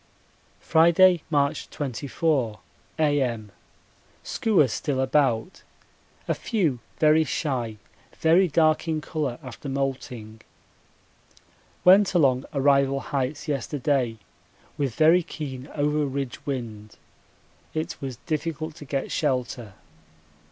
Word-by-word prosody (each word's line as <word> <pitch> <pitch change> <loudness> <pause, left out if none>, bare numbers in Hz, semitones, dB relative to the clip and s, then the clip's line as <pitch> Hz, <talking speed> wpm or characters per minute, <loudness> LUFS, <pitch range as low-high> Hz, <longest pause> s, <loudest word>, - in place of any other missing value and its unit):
Friday, 170 +2 +5
March 140 -2 0
24, 135 -3 -1 0.4
A.M. 130 -9 0 0.7
Skuas 180 - +2
still 140 -3 -2
about, 130 +1 +1 0.7
a - - +2
few 170 - -1 0.2
very 155 +1 +5
shy 125 -8 -2 0.4
very 170 +4 +4
dark 155 +1 +2
in 160 -1 0
colour 145 -5 -3
after 130 +2 -8
moulting. 130 -5 -4 1.4
Went 190 +1 +6
along 135 -6 +3
Arrival 140 -1 +3
Heights 135 +3 -3
yesterday 135 -3 -1 0.6
with 135 -5 -2
very 165 +3 +5
keen 140 -5 -7
over 150 0 +1
ridge 135 -1 -4
wind 110 -6 -5 0.8
it 155 0 -3
was 135 -2 -4
difficult 155 0 -3
to 145 - -10
get 135 -1 -3
shelter. 125 -6 -2
140 Hz, 100 wpm, -25 LUFS, 130-155 Hz, 1.4 s, Went